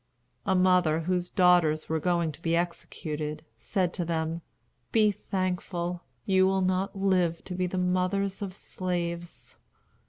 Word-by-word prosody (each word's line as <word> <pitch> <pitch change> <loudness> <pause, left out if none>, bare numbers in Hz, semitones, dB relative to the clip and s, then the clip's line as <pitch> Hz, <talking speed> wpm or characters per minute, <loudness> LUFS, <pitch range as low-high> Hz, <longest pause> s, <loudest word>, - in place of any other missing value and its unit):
A 190 - +3
mother, 180 -3 +4
whose 180 +1 -1
daughters 175 -5 +4
were 160 0 0
going 170 -1 +1
to 150 - -13
be 165 -1 +1
executed, 155 -3 -3
said 180 - 0
to 175 - -2
them: 165 0 -2 0.5
"Be 215 -2 +4
thankful. 180 -2 -2 0.2
You 190 -1 +4
will 190 0 +2
not 185 +2 0
live 185 -4 +1
to 185 - -5
be 180 0 0
the 185 - -3
mothers 185 +2 0
of 190 -2 -4
slaves." 175 -3 -4
180 Hz, 145 wpm, -28 LUFS, 170-185 Hz, 0.5 s, mother